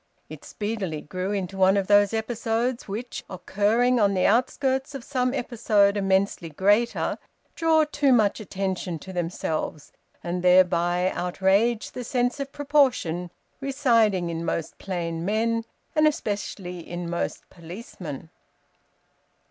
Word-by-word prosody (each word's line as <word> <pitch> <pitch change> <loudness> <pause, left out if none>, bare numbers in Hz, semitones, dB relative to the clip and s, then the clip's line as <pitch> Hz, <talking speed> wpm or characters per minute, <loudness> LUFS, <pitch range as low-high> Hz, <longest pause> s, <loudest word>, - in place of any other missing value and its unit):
It - - -10
speedily 205 -8 -4
grew 185 +6 -4
into 195 -1 -3
one 190 +1 +5
of 195 - +1
those 205 0 +5
episodes 230 +2 -1
which, 225 +5 -5
occurring 215 +7 +1
on 200 -2 +3
the 185 - +2
outskirts 265 +4 +1
of 270 - -6
some 255 -2 0
episode 220 -6 +2
immensely 195 -3 +1
greater, 205 +9 +1 0.3
draw 320 -1 +3
too 290 -2 +1
much 215 -4 +3
attention 190 -4 -3
to 190 +5 -10
themselves 165 -3 -3 0.3
and 175 +1 -3
thereby 180 0 +4
outrage 195 +6 +1
the 250 - -6
sense 245 +2 0
of 275 0 -4
proportion 260 - +1 0.3
residing 230 - +2
in 165 0 -4
most 165 -1 -3
plain 170 -3 -3
men, 225 +3 0 0.3
and 310 0 +5
especially 200 - -3
in 175 +1 -6
most 170 0 -3
policemen. 170 - -9
200 Hz, 125 wpm, -25 LUFS, 180-240 Hz, 0.3 s, one